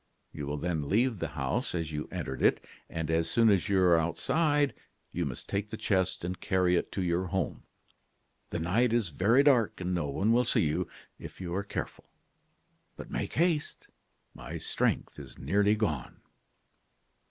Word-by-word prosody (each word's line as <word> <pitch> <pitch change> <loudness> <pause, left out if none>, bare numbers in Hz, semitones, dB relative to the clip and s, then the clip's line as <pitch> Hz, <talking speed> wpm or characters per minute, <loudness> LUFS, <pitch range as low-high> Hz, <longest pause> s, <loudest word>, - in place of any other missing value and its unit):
You 70 - -5
will 75 +1 -2
then 80 -2 -2
leave 115 0 +2
the - - -1
house - - -1
as 80 -2 -2
you 75 0 -4
entered 65 - -4
it, - - +3 0.2
and 80 -1 -3
as 80 0 +1
soon 115 +1 +4
as 100 0 +1
you 100 -1 +3
are 85 -2 +5
outside, 145 - +1 0.4
you 85 -2 -1
must 60 - -7
take 100 +1 -2
the 110 - -5
chest 95 -6 0
and 90 +1 -3
carry 90 -1 +2
it - - -1
to 95 - -1
your 90 +1 0
home. 95 +2 -2 0.9
The - - -3
night 110 +9 +2
is 115 -7 +2
very 110 - +4
dark, 125 -7 +3
and 90 0 -2
no 85 -5 0
one 95 +10 +1
will 120 +2 +4
see 115 - +2
you, 75 - 0 0.3
if - - -10
you 90 -2 -4
are 95 - 0
careful. 100 - -5 0.9
But - - -9
make - - -3
haste; 165 -2 0 0.4
my - - -7
strength - - -1
is - - -11
nearly 100 +8 +2
gone. 80 - -2
95 Hz, 175 wpm, -30 LUFS, 80-110 Hz, 0.9 s, are